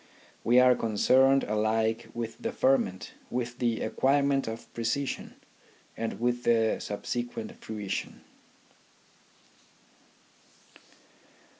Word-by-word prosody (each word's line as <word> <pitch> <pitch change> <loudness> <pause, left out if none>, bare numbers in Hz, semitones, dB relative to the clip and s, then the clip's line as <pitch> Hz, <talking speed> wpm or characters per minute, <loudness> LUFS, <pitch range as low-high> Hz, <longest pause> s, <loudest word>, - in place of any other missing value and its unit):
We 120 +2 +5
are 125 0 +7
concerned 130 +5 +3
alike 110 +1 0
with 115 -1 -5
the 230 - -3
ferment, 130 - +1 0.2
with 125 0 -3
the 120 -2 0
acquirement 140 0 +1
of 115 +1 -7
precision, 120 +4 -2 0.6
and 115 0 -4
with 120 +1 0
the 115 -1 +3
subsequent 120 - -4
fruition. 105 -3 -5
120 Hz, 90 wpm, -28 LUFS, 110-130 Hz, 0.6 s, are